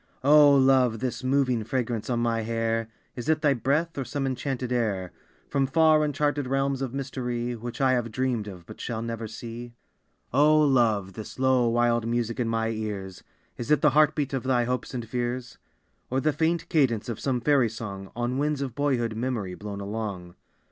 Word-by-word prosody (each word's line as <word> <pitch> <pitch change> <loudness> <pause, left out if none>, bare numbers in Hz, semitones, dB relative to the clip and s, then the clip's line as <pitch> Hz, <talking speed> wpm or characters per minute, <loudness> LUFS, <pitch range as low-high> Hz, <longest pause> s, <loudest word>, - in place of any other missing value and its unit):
O 145 0 +7
Love, 130 -3 +4
this 130 +2 -3
moving 130 -3 +1
fragrance 115 -2 -2
on 120 -1 0
my 115 -1 +1
hair, 115 0 -1 0.3
Is 125 +4 -5
it 160 0 +2
thy 145 -2 +5
breath, 140 +6 0
or - - -1
some 135 +3 -3
enchanted 130 -1 -3
air 105 -7 -1 0.4
From 135 -1 +1
far, 155 +1 +4
uncharted 145 -1 0
realms 135 0 0
of 130 -3 -2
mystery 125 -3 -3
Which 120 +3 -7
I 135 -2 +3
have 120 -3 0
dreamed 120 -3 -1
of 90 -4 -9
but - - -11
shall 115 -2 -3
never 115 -1 -4
see? 120 +2 -8 0.6
O 150 +3 +5
Love, 115 -9 +2
this 110 +3 -8
low, 130 -2 +3
wild 120 -1 +2
music 115 0 -1
in 120 -2 0
my 115 0 0
ears, 105 -4 -5 0.3
Is 120 - -6
it 150 - +4
the 150 - +5
heart 150 +1 +4
beat 145 -3 -2
of 135 - 0
thy 125 -1 +1
hopes 125 +2 -3
and 120 -2 -4
fears, 120 0 -3 0.5
Or 130 - 0
the 155 +2 +1
faint 165 +1 0
cadence 130 - +1
of 115 -3 -4
some 130 -3 0
fairy 130 -2 +3
song 100 -3 -7
On 120 +2 -1
winds 145 -1 0
of 130 -4 -5
boyhood 120 -5 0
memory 115 -6 -2
blown 100 +1 -7
along? 100 -4 -5
125 Hz, 190 wpm, -26 LUFS, 115-135 Hz, 0.6 s, O